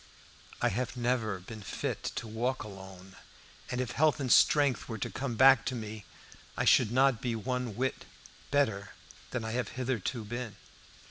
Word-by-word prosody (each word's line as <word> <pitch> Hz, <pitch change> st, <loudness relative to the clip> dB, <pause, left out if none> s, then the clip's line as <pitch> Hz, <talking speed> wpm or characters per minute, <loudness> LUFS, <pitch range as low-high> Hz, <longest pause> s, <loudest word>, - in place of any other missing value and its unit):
I -, -, +4 dB
have 125 Hz, +5 st, -3 dB
never 120 Hz, -4 st, 0 dB
been 105 Hz, +4 st, -10 dB
fit 95 Hz, -, -3 dB
to -, -, -4 dB
walk 120 Hz, +4 st, -2 dB
alone, 95 Hz, -2 st, -11 dB, 0.5 s
and 125 Hz, -, -2 dB
if 125 Hz, -1 st, -2 dB
health 155 Hz, +3 st, +3 dB
and 130 Hz, -4 st, -1 dB
strength 145 Hz, -4 st, +4 dB
were 115 Hz, -, -3 dB
to -, -, -4 dB
come 130 Hz, -3 st, -3 dB
back 130 Hz, 0 st, +7 dB
to 130 Hz, -, -1 dB
me 110 Hz, -2 st, -6 dB, 0.5 s
I -, -, +1 dB
should 115 Hz, -4 st, +5 dB
not 130 Hz, -1 st, +3 dB
be 120 Hz, -4 st, -1 dB
one 125 Hz, 0 st, -3 dB
whit 130 Hz, +3 st, -2 dB, 0.4 s
better 110 Hz, -8 st, +1 dB, 0.4 s
than 125 Hz, -3 st, -3 dB
I 110 Hz, -, -3 dB
have 125 Hz, +2 st, -1 dB
hitherto 125 Hz, -2 st, -2 dB
been. 120 Hz, 0 st, -5 dB
120 Hz, 165 wpm, -31 LUFS, 110-130 Hz, 0.5 s, back